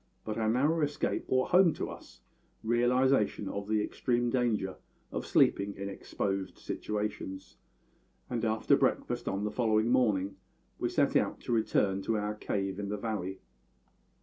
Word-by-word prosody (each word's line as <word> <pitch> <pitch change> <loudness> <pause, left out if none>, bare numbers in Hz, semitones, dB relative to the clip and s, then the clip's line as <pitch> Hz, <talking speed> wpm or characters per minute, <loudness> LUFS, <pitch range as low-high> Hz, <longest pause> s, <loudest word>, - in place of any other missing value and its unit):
But 110 +1 -3
our 110 -1 +1
narrow 145 +8 +2
escape 145 0 -1
brought 130 0 +1
home 180 -2 +6
to - - -4
us 65 - -13 0.4
realisation 120 -2 +2
of 100 +1 -4
the 105 -1 +1
extreme 120 +2 0
danger 115 -7 0 0.3
of - - -4
sleeping 100 0 +3
in 100 0 -5
exposed 95 -1 -3
situations; 105 -3 -4 0.7
and 120 -2 -3
after 110 -1 +3
breakfast - - 0
on 100 +1 -1
the 105 - -1
following 110 0 +2
morning 100 -6 +2 0.4
we - - 0
set - - +1
out - - +2
to - - -5
return 100 -4 +2
to 110 +3 0
our 105 0 -1
cave 95 -2 -3
in 100 -1 -3
the 105 - -2
valley. 100 -4 -4
105 Hz, 150 wpm, -31 LUFS, 100-120 Hz, 0.7 s, home